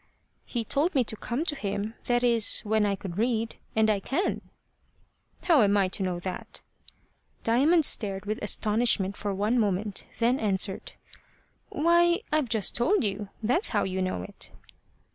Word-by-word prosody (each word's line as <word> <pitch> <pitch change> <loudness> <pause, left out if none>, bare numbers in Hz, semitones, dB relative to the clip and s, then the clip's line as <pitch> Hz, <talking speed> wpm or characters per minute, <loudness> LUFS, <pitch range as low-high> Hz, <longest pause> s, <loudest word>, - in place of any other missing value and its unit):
"He 235 -2 -3
told 300 - +1
me 260 - +4
to 220 - -4
come 245 +8 -3
to 315 - -1
him 205 -2 -3
that 240 0 +1
is, 235 -3 +3
when 215 0 +1
I 200 - 0
could 190 -1 -7
read 230 -1 -1 0.2
and 220 0 +3
I 210 -2 +2
can." 280 - -1 1.0
"How 325 -7 +5
am 205 -1 +3
I 195 -2 +2
to 195 - -7
know 180 -2 -1
that?" 185 0 -7 0.8
Diamond 290 +8 +4
stared 195 -5 +1
with 215 +1 -3
astonishment 210 -2 +1
for 205 -1 -3
one 210 +5 +1
moment, 205 -1 -1
then 245 +3 +2
answered: 195 -2 -2 0.8
"Why, 345 +4 +3
I've 300 -5 +1
just 220 -4 +1
told 320 +11 +2
you. 200 -1 -2
That's 255 - +2
how - - +1
you 190 0 -2
know 185 - -2
it." 95 - -8
220 Hz, 160 wpm, -27 LUFS, 200-250 Hz, 1.0 s, How